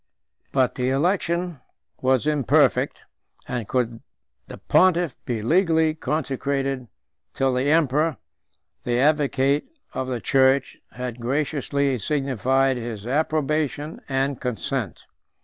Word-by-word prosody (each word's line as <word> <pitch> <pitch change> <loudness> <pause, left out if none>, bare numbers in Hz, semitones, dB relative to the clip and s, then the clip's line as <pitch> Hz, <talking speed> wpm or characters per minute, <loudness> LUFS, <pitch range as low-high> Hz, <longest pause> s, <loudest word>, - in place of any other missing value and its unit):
But 130 -2 +2
the 125 0 -1
election 170 +1 0 0.4
was 130 0 +2
imperfect; 150 -6 +2 0.5
nor 125 -2 -2
could 120 0 -1 0.5
the - - -9
pontiff 175 -6 +3
be 115 -4 -2
legally 160 - +3
consecrated 135 -4 -2 0.5
till 135 -1 +1
the 130 +3 +1
emperor, 155 -1 +2 0.7
the 120 -1 0
advocate 145 -1 +2 0.3
of 130 - -3
the 125 -2 -2
church, 135 +1 +2
had 125 -1 -6
graciously 140 0 0
signified 135 0 +1
his 115 -3 -6
approbation 150 +2 -1
and 135 0 -1
consent. 125 - -3
135 Hz, 105 wpm, -23 LUFS, 125-150 Hz, 0.7 s, pontiff